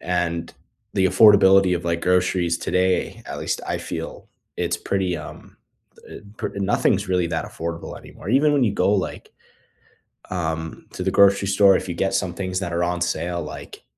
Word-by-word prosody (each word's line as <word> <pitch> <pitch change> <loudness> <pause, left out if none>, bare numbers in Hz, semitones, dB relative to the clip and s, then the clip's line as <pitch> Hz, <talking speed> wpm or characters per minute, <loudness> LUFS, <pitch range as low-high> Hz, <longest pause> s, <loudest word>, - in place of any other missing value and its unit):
and 85 -2 -2 0.4
the 95 -1 +2
affordability 95 -2 +6
of, 85 - -8
like, 85 0 -1
groceries 90 -1 +1
today, 95 0 0
at - - -6
least - - -2
I - - -2
feel - - -7 0.3
it's 85 -1 -1
pretty, 95 -3 -1
um, 75 -1 -11 0.5
eh, - - -9 0.2
pr - - -2
nothing 100 -1 +2
is - - -4
really 90 -2 +1
that 80 -1 -2
affordable 85 0 -6
anymore. 90 - -12
Even 145 +4 +4
when 140 -3 +3
you 105 - +1
go, 100 0 +2
like, 100 -3 -3 1.0
um, 80 -2 -4
to 90 - -4
the 95 - 0
grocery 100 0 +4
store, 100 0 +5
if 95 - -2
you - - -2
get 95 +2 -1
some 95 -2 -1
things 95 0 -3
that 90 -3 -4
are 85 +1 0
on 90 0 -1
sale, 85 +1 -2
like, - - -9
90 Hz, 180 wpm, -22 LUFS, 85-95 Hz, 1.0 s, affordability